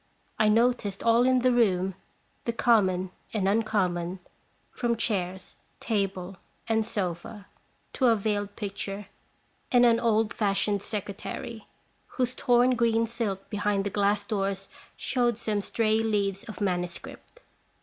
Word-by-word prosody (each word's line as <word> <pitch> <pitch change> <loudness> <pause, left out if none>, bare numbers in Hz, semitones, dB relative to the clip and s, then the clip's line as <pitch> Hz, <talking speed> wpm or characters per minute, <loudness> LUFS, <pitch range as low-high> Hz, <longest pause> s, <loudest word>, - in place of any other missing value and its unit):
I 215 - +5
noticed 225 -3 +2
all 235 +1 +4
in 255 -1 +4
the 255 +1 +4
room, 195 -6 +2 0.5
the 235 - 0
common 190 -6 +2 0.2
and 200 -4 0
uncommon, 190 -4 0 0.5
from 235 -1 0
chairs, 190 -4 -2 0.2
table, 195 -4 -2 0.3
and 225 -1 +2
sofa 200 -1 -4 0.5
to 260 - +2
a 230 - +5
veiled 205 -1 -2
picture 200 -1 -5 0.6
and 245 -1 +6
an 230 -1 +5
old 225 -1 +2
fashioned 200 -1 +1
secretary, 210 +2 -5 0.5
whose 250 -1 +1
torn 245 0 +3
green 230 -1 +2
silk 220 -4 -3
behind 205 -1 0
the 200 - -3
glass 205 0 +1
doors 195 -2 -2 0.3
showed 240 -3 0
some 215 -3 -1
stray 220 +1 +1
leaves 205 -3 0
of 215 - -9
manuscript. 180 - -4
210 Hz, 130 wpm, -27 LUFS, 195-230 Hz, 0.6 s, and